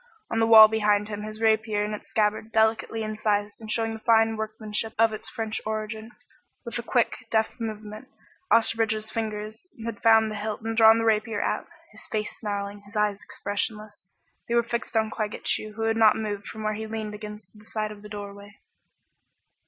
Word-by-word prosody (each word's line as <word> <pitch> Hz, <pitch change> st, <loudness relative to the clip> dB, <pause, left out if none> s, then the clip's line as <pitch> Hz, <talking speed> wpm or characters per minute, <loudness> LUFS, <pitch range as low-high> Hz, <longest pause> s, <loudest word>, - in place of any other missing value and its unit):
On 225 Hz, -, 0 dB
the 225 Hz, -, +3 dB
wall 220 Hz, -1 st, +11 dB
behind 210 Hz, -1 st, +1 dB
him 205 Hz, -1 st, -4 dB
hung 210 Hz, -, -6 dB
his 215 Hz, 0 st, -7 dB
rapier 220 Hz, -1 st, +2 dB
in 210 Hz, -, -4 dB
its 210 Hz, -, -8 dB
scabbard, 215 Hz, -1 st, 0 dB
delicately 220 Hz, 0 st, +1 dB
incised 210 Hz, -1 st, -1 dB
and 220 Hz, -, -9 dB
showing 225 Hz, 0 st, 0 dB
the 220 Hz, -, -7 dB
fine 225 Hz, 0 st, +4 dB
workmanship 220 Hz, 0 st, -3 dB
of 225 Hz, -1 st, +4 dB
its 215 Hz, -, -5 dB
French 220 Hz, -1 st, -4 dB
origin. 220 Hz, +1 st, -4 dB, 0.6 s
With -, -, -4 dB
a -, -, -2 dB
quick, -, -, +1 dB
deft 220 Hz, +2 st, 0 dB
movement, 215 Hz, +1 st, -6 dB, 0.4 s
Osterbridge's 220 Hz, -1 st, +2 dB
fingers 215 Hz, +4 st, -4 dB, 0.2 s
had 230 Hz, -3 st, -5 dB
found 220 Hz, -1 st, +5 dB
the -, -, -4 dB
hilt 210 Hz, +1 st, -4 dB
and 225 Hz, 0 st, -3 dB
drawn 225 Hz, 0 st, +7 dB
the 230 Hz, -, 0 dB
rapier 220 Hz, -1 st, +1 dB
out, -, -, -2 dB, 0.2 s
his -, -, -11 dB
face 215 Hz, -1 st, -3 dB
snarling, 205 Hz, -1 st, -4 dB
his 205 Hz, -, -16 dB
eyes 210 Hz, -1 st, +1 dB
expressionless. 210 Hz, -1 st, -4 dB, 0.4 s
They 235 Hz, -, 0 dB
were 235 Hz, -, +4 dB
fixed 235 Hz, 0 st, -3 dB
on 220 Hz, 0 st, +1 dB
Claggett 215 Hz, -2 st, -4 dB
Chew 215 Hz, 0 st, 0 dB
who 225 Hz, +1 st, -4 dB
had 225 Hz, 0 st, +1 dB
not 220 Hz, -1 st, +6 dB
moved 205 Hz, -2 st, -4 dB
from 220 Hz, -1 st, -7 dB
where 215 Hz, 0 st, 0 dB
he 220 Hz, +1 st, -5 dB
leaned 215 Hz, -1 st, -4 dB
against 210 Hz, -2 st, -9 dB
the 210 Hz, 0 st, -18 dB
side 215 Hz, -1 st, -3 dB
of 210 Hz, -1 st, -11 dB
the 210 Hz, -, -11 dB
doorway. 205 Hz, 0 st, -9 dB
215 Hz, 195 wpm, -26 LUFS, 210-225 Hz, 0.6 s, wall